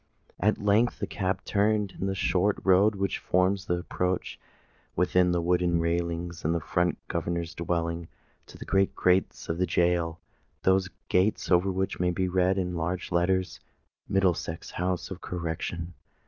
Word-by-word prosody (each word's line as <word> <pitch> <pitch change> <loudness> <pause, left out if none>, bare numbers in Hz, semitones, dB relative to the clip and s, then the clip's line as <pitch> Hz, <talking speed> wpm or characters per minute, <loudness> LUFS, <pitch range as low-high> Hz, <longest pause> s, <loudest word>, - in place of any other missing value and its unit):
At 105 +3 +2
length 105 +4 +2
the - - -2
cab 95 0 -2
turned 105 -1 +1
into 95 - -5
the 95 - -1
short 95 +2 +1
road 100 +3 +4
which 100 0 -1
forms 95 +1 +1
the 90 - +1
approach, 90 +1 -2 0.6
within 90 0 +3
the 85 -1 0
wooden 90 -1 +2
railings 85 0 -2
in 85 +2 +1
front 90 +2 0
of - - -16
the - - -7
governor's 85 -1 -2
dwelling, 85 0 -2 0.4
to - - -13
the - - -8
great 95 0 +2
gates 90 +1 +1
of 80 +1 -2
the 90 - +2
gaol,—those 85 +1 0 0.2
gates 95 +3 +1
over 90 +2 +4
which 95 +1 -2
may 90 0 +2
be 90 +1 0
read 95 +1 +2
in 90 -2 -1
large 85 +2 -3
letters, 90 +2 +1 0.5
"MIDDLESEX 90 -4 0
HOUSE 90 +1 -2
OF 95 - -7
CORRECTION." 85 0 -4
90 Hz, 160 wpm, -28 LUFS, 85-95 Hz, 0.6 s, road